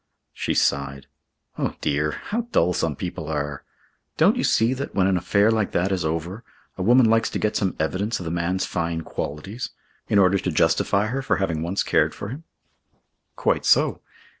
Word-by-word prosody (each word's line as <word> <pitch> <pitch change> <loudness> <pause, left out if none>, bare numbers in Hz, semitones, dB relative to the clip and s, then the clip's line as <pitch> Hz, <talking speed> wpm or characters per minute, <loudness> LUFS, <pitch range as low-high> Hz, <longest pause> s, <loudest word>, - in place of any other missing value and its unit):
She - - -2
sighed. 70 -1 0 0.5
"Oh, - - -1
dear! 75 +1 0
How 235 +2 -4
dull 90 +2 +3
some 80 -3 -1
people 85 0 -5
are! 75 -2 -3 0.5
Don't - - +5
you - - -1
see 115 +3 +3
that, 135 +2 -5
when 95 - +3
an 95 -1 +2
affair 100 +4 +3
like 110 -3 0
that 90 +3 +1
is 95 -2 0
over, 80 +7 -3 0.3
a - - -6
woman 120 +6 +5
likes 115 0 +3
to - - -3
get 105 - -1
some 95 -4 0
evidence 95 +8 -1
of 90 - -7
the 80 - -3
man's 85 +2 -1
fine 85 -1 -2
qualities, 80 - -5 0.4
in - - +2
order 95 0 +4
to 90 - -2
justify 85 +6 +2
her 130 +5 -2
for 135 - +1
having 85 -5 -1
once 90 +4 -1
cared - - +2
for 100 - -6
him?" 145 +7 -8 0.9
"Quite - - +1
so. - - +3
95 Hz, 190 wpm, -23 LUFS, 80-105 Hz, 0.9 s, Don't